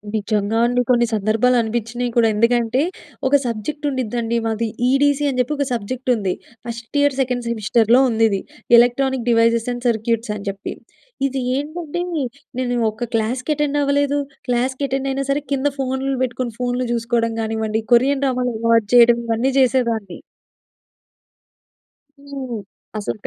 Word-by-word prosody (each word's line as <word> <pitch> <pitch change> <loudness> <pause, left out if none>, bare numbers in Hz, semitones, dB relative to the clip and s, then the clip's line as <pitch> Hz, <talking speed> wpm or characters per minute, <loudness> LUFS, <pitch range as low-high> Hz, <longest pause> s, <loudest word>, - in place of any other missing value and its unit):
నిజంగా 210 +1 0
అండి! 245 +1 +2
కొన్ని 240 -1 +4
సందర్భాలనిపించినాయి 230 +2 0
కూడ. 235 - +4
ఎందుకంటే 235 +3 +2 0.5
ఒక 275 - -2
సబ్జెక్ట్ 240 +7 -4
ఉండిద్దండి 235 -3 -2
మాది 225 +1 -1 0.2
ఈడీసీ 285 +1 +3
అని 255 - -3
జెప్పి 250 +4 +1
ఒక 280 - 0
సబ్జెక్ట్ 250 +3 -4
ఉంది. 195 -4 -1 0.3
ఫస్ట్ 235 +3 -8
ఇయర్ 285 -2 +2
సెకండ్ 250 -2 -2
సెమిస్టర్‌లో 230 +2 +3
ఉందిది. 220 -3 +2 0.4
ఎలక్ట్రానిక్ 245 +1 +2
డివైసెస్ 230 0 +3
అండ్ 245 +1 -8
సర్క్యూట్స్ 225 0 -1
అని 200 - -8
చెప్పి. 195 0 -5 0.5
ఇది 270 0 -3 0.2
ఏంటంటే 310 +3 -4 0.6
నేను 245 -1 -1 0.2
ఒక 235 +2 -5
క్లాస్‍‌కెటెండవ్వలేదు, 285 +4 0 0.3
క్లాస్‍‌కెటెండైయినా 265 +2 -1
సరే 290 +1 0
కింద 275 +1 +1
ఫోన్‌లు 265 +1 -1
బెట్టుకొని, 245 -1 -3
ఫోన్‌లు 245 0 -1
జూసుకోవడం 230 -1 0
గానివ్వండి 220 0 -1
కొరియన్ 270 +3 +3
డ్రామాలు 250 -2 0
అలువటు 230 -2 +2
చేయడం. 235 0 +7
ఇవన్నీ 230 +4 +1
జేసేదాన్ని. 230 -7 +1 2.0
హ్మ్. 270 -5 -6 0.4
అసలు 210 +1 -3
240 Hz, 125 wpm, -20 LUFS, 225-265 Hz, 2.0 s, చేయడం